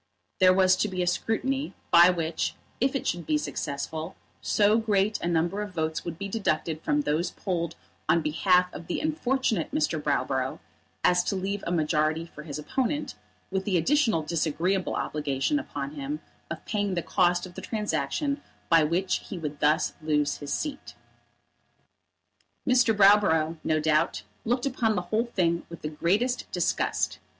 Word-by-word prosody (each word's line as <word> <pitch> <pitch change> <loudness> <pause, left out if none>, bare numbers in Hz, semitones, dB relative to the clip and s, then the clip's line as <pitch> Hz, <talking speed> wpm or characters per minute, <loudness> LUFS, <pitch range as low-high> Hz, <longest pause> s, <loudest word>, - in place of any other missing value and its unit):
There 185 -1 +7
was 185 0 +5
to 210 - +1
be 185 -2 -2
a - - 0
scrutiny, 260 +10 -1 0.2
by 175 +1 +8
which, 165 -2 -1 0.2
if 265 +3 +1
it 275 - -2
should 175 0 -2
be 305 - +2
successful, 155 - -4 0.3
so 210 +2 +3
great 210 -1 +1
a - - -1
number 175 +4 0
of 205 -3 -6
votes 160 -1 -1
would 170 -2 -5
be 200 - -4
deducted 165 -6 -1
from 295 - +1
those 170 - 0
polled 170 -3 -3 0.3
on 170 - +4
behalf 180 +4 +3
of 170 - -8
the - - -2
unfortunate 265 - 0
Mr. 305 +2 0
Browborough - - 0 0.5
as 180 0 +4
to 200 - 0
leave 195 +2 -3
a - - -1
majority 155 0 +1
for 160 - -11
his 150 -2 -6
opponent, 260 - -2 0.4
with 190 0 -1
the 190 -2 +1
additional 225 - +2
disagreeable 170 +4 0
obligation 150 - -1
upon 285 - -5
him 295 0 -4 0.3
of - - -6
paying 205 -3 -1
the 170 - -1
cost 175 -1 +2
of 180 - -11
the - - -7
transaction 280 +6 -2 0.3
by 165 -2 +6
which 175 +5 +1
he 195 - -5
would 150 -3 -5
thus 150 +2 +2
lose 150 -2 +1
his 145 -1 -7
seat. 295 -2 -4 1.7
Mr. 250 -2 +5
Browborough, 195 -6 +5
no 155 0 +1
doubt, 155 0 +1 0.2
looked 245 +3 0
upon 235 -5 +1
the 180 - -1
whole 225 +2 +3
thing 170 -7 0
with 170 - -10
the 150 - -2
greatest 205 +11 0
disgust. - - 0
180 Hz, 165 wpm, -27 LUFS, 160-220 Hz, 1.7 s, by